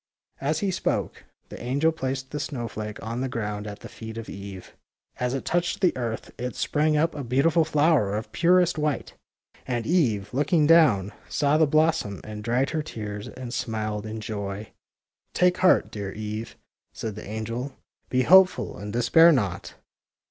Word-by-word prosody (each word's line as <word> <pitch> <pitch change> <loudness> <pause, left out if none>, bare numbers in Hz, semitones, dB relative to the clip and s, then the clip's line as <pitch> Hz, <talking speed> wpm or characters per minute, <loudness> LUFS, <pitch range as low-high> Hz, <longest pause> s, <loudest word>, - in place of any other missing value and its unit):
" - - -34
As 155 +1 0
he 200 -2 +1
spoke, - - -2 0.2
the - - -9
angel 140 +6 +1
placed 130 -3 -4
the 150 - -3
snow 130 -5 -4
flake 105 -1 -6
on 115 +2 -3
the 130 - -1
ground 105 -3 -4
at 105 0 -8
the - - -8
feet 110 0 -9
of 115 - -6
Eve. 100 -1 -9 0.4
As 125 +1 0
it 135 - -4
touched 175 +1 0
the 185 - +2
earth 115 -3 -4
it 125 0 -4
sprang 150 0 +1
up 165 +2 +2
a 145 - -5
beautiful 140 +7 +3
flower 150 -9 +2
of 110 0 -6
purest 175 +5 +3
white. 150 -2 -1 0.5
And 120 -3 -2
Eve, 115 - +1
lopking 150 +4 +2
down, 145 - +5 0.2
saw 145 0 +2
the 160 - +5
blossom, 155 -9 +1
and 105 -1 -7
dried 120 +4 +1
her 160 - -1
tears 105 -7 -6
and 125 -1 -8
smiled 110 -3 -3
in 110 0 -5
joy. 100 -1 -5 0.6
Take 180 0 +3
heart, 185 - +4
dear 100 -2 -5
Eve," 110 +2 -5 0.4
said 110 - -4
the 110 - -9
angel. 115 +5 -4 0.3
Be 130 0 +2
hopeful 185 +6 +5
and 105 0 -6
despair 160 +9 +6
not. 100 - -1
125 Hz, 175 wpm, -25 LUFS, 110-155 Hz, 0.6 s, despair